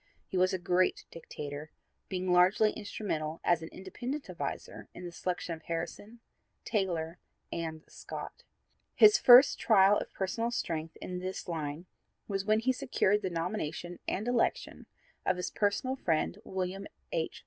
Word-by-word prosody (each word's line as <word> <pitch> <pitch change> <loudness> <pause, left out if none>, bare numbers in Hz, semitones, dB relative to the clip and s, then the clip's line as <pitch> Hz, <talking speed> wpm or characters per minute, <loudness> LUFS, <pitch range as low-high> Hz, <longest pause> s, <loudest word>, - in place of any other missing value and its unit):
He - - -8
was 185 +1 +4
a 190 - 0
great 180 +1 +1
dictator, 150 -2 -7 0.4
being 185 -1 0
largely 190 +4 +5
instrumental 165 -7 -4
as 175 -2 +3
an 160 - -7
independent 245 +10 -6
advisor - - -5
in - - -8
the 175 - -6
selection 175 0 -3
of 160 - -8
Harrison, 175 +7 -5 0.4
Taylor 175 -5 -1 0.3
and 160 -1 -4
Scott. - - -8 0.5
His 420 -2 +8
first 250 +2 +8
trial 205 -2 +5
of - - -7
personal 215 +5 -1
strength 165 -8 -3
in 180 0 -5
this 185 +1 -5
line 160 -1 -4 0.4
was 195 -1 -2
when 215 +1 +3
he 260 +3 +3
secured 210 -4 +1
the 190 - -1
nomination 175 -1 -3
and 210 +5 -2
election 245 -1 0 0.4
of 185 - +1
his 180 - -3
personal 215 +6 0
friend, 170 0 0
William 190 +1 -3 0.2
H. - - -2
185 Hz, 150 wpm, -31 LUFS, 170-210 Hz, 0.5 s, His